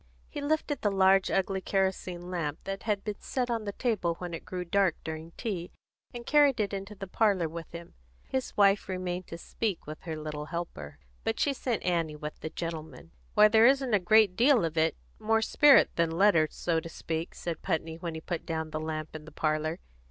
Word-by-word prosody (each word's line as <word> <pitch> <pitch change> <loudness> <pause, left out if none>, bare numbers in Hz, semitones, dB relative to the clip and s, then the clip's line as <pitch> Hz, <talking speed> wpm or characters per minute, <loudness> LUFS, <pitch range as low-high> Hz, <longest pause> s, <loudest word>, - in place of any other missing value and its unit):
He 290 - -6
lifted 295 -1 -1
the 205 - +2
large 195 -1 +4
ugly 195 0 0
kerosene 185 -2 -1
lamp 155 -5 -2
that 195 0 -4
had 205 -2 0
been 210 -2 -4
set 250 -2 -2
on 225 -2 -2
the 205 - -2
table 200 -7 -1
when 175 0 -6
it 165 - -6
grew 180 -1 -4
dark 190 0 +2
during 160 0 -6
tea, 185 -7 -3 0.4
and 240 -1 -8
carried 290 -4 +4
it 205 -1 0
into 200 +1 -5
the 195 0 -6
parlour 195 -3 +2
with 165 0 -8
him. 170 0 -9 0.3
His 260 -1 -3
wife 200 -1 +4
remained 185 -1 -3
to 165 - -7
speak 200 +2 -3
with 155 +1 -8
her 160 -3 -5
little 150 -1 -5
helper, 75 - -6 0.3
but 225 - -1
she 285 - +2
sent 245 -4 -2
Annie 165 -4 0
with 150 0 -6
the 155 - -5
gentlemen. 165 0 -6 0.2
"Why, 210 0 +8
there 220 +2 +6
isn't 265 -3 +2
a 205 - +5
great 200 +1 +4
deal 245 -2 +4
of 160 -1 -3
it 160 0 +2 0.2
more 225 +1 +2
spirit 290 +4 +6
than 170 -1 +2
letter, 165 -2 +4
so 165 -2 -1
to 165 - -8
speak," 165 +1 -4
said 170 -2 -5
Putney, 160 -3 -2
when 170 -2 -4
he 160 - -6
put 170 0 -4
down 160 -1 -3
the 155 - -3
lamp 155 0 -5
in 155 -1 -8
the 160 - -11
parlour. 155 +2 -1
180 Hz, 210 wpm, -29 LUFS, 160-210 Hz, 0.4 s, Why